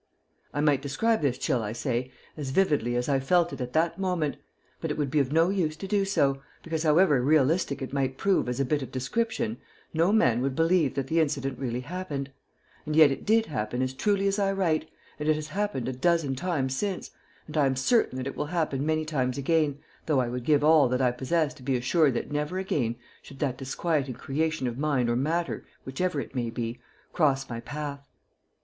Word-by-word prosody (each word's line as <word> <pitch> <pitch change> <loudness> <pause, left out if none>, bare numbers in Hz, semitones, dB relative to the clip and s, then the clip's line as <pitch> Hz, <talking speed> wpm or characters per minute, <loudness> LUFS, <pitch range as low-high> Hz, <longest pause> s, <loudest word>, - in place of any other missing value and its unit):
I 145 - -1
might 145 -3 +3
describe 190 +11 +1
this 135 -4 +1
chill, 125 - 0
I 105 0 -3
say, 125 +1 -2 0.2
as 145 -3 -5
vividly 140 -7 +2
as 120 0 0
I 140 -2 +2
felt 170 +5 +2
it - - -6
at 125 0 -4
that 170 +2 +1
moment, 180 -6 -1 0.4
but - - -3
it - - -2
would 145 -3 -1
be 150 - +3
of 135 -1 +1
no 165 +3 +4
use 175 -6 0
to 195 - -6
do 200 0 +1
so, 135 -8 +1 0.2
because, 165 -1 -2
however 155 -3 +4
realistic 145 +1 +2
it 130 - -6
might 135 -1 -1
prove 195 -10 +1
as 125 +1 -3
a 135 - +2
bit 145 +2 0
of 130 - -6
description, 225 - -2 0.3
no 165 +4 +3
man 125 - +3
would 135 0 -1
believe 165 -3 +2
that 135 - -1
the 160 +5 +1
incident 140 -4 -1
really 125 -2 -2
happened; 145 -3 -5 0.6
and 155 - -1
yet 155 -3 +7
it 135 - -5
did 225 +1 +4
happen 125 - -2
as 130 0 -2
truly 200 +7 +1
as 195 +1 0
I 195 -1 +2
write, 160 -5 0 0.3
and 150 +1 -1
it 155 - +4
has 155 0 -5
happened 195 - -2
a 130 - -2
dozen 145 0 +1
times 135 -5 -1
since, 195 +3 -3 0.3
and 155 - -10
I 145 -3 +4
am 135 - 0
certain 135 - +2
that 130 - -3
it 140 - -4
will - - -3
happen 155 -5 -1
many 155 +1 0
times 130 -4 -1
again, 150 0 +1 0.3
though 150 -4 +3
I 125 -2 0
would 125 0 -4
give 145 -1 +3
all 155 -3 +6
that 125 +1 0
I 125 - +4
possess 150 +5 0
to 150 - -17
be 130 0 0
assured 135 +2 +2
that 120 - -3
never 150 +5 -2
again 135 -11 -1 0.3
should 140 - -13
that 130 -3 -2
disquieting 135 -1 -1
creation 155 +2 -1
of 120 +1 -3
mind 135 -5 +1
or - - +1
matter, 165 +7 -1 0.2
whichever 150 +4 -1
it - - -6
may 120 -3 -1
be, 115 +1 -4 0.3
cross 135 -4 +2
my 115 -1 -5
path. 140 0 -6
145 Hz, 220 wpm, -27 LUFS, 130-165 Hz, 0.6 s, yet